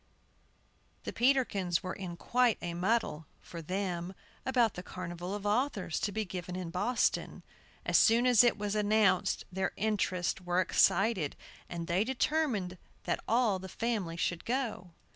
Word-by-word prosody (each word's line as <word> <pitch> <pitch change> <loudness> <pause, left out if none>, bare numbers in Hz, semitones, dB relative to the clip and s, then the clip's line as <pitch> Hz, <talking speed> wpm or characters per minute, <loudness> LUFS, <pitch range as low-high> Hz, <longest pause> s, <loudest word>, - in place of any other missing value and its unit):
THE - - -5
Peterkins 220 -9 +2
were 185 - -3
in 180 -3 -6
quite 245 +3 +2
a 175 -1 -4
muddle 180 -4 0
(for 170 - -9
them) 180 +1 -3 0.3
about 245 -5 +3
the 180 - -6
carnival 180 +1 -6
of 205 0 -7
authors, 210 - 0
to 205 - -1
be 220 +2 -2
given 180 -1 -6
in 180 -2 -5
Boston. 235 +8 0 0.4
As - - +4
soon 235 +2 +5
as 245 -2 +7
it 240 -2 +3
was 205 -1 -2
announced, 210 -3 +2
their 190 +1 -1
interests 195 -4 0
were 180 0 0
excited, 190 -3 +2 0.3
and 170 -1 -4
they 175 +4 +1
determined 240 - -1 0.2
that - - -1
all 225 -5 +2
the 190 0 -8
family 210 -8 -2
should 170 -1 -1
go. 235 -7 -2
195 Hz, 150 wpm, -31 LUFS, 180-230 Hz, 0.4 s, as